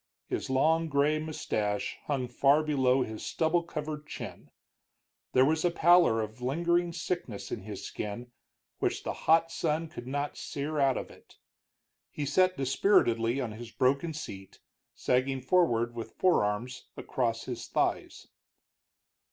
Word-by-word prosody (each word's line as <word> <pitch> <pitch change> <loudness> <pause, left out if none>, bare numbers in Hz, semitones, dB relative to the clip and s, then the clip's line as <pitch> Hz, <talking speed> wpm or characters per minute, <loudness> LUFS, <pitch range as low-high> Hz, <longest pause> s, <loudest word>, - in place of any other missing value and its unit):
His - - -3
long 160 +5 +2
gray 145 +2 +2
mustache 105 -9 -2
hung 135 -4 -1
far 140 +5 +3
below 135 -4 +2
his 110 -2 -7
stubble 165 +1 +1
covered 150 -2 -6
chin; - - -8 0.8
there 130 +1 +6
was 155 +2 +1
a 175 - +4
pallor 170 -8 +5
of 110 +3 -6
a - - -7
lingering 170 +6 +1
sickness 165 - -4
in 110 - -3
his 100 0 -7
skin, 120 +4 -6 0.5
which - - -1
the - - -2
hot 165 +1 +3
sun 160 0 -1
could 120 -6 -9
not 145 +2 -3
sere 150 +2 -3
out 135 -2 +3
of - - -6
it. - - -19 0.7
He 145 - -4
sat 185 +6 +3
dispiritedly 130 - +2
on 125 -5 -2
his 115 +2 -8
broken 140 +7 +1
seat, 95 -11 -8 0.4
sagging 130 +1 +1
forward 125 -6 +2
with 115 -2 -7
forearms 125 - +1
across 115 -3 -1
his 120 -3 -5
thighs. - - -1
135 Hz, 145 wpm, -29 LUFS, 120-160 Hz, 0.8 s, there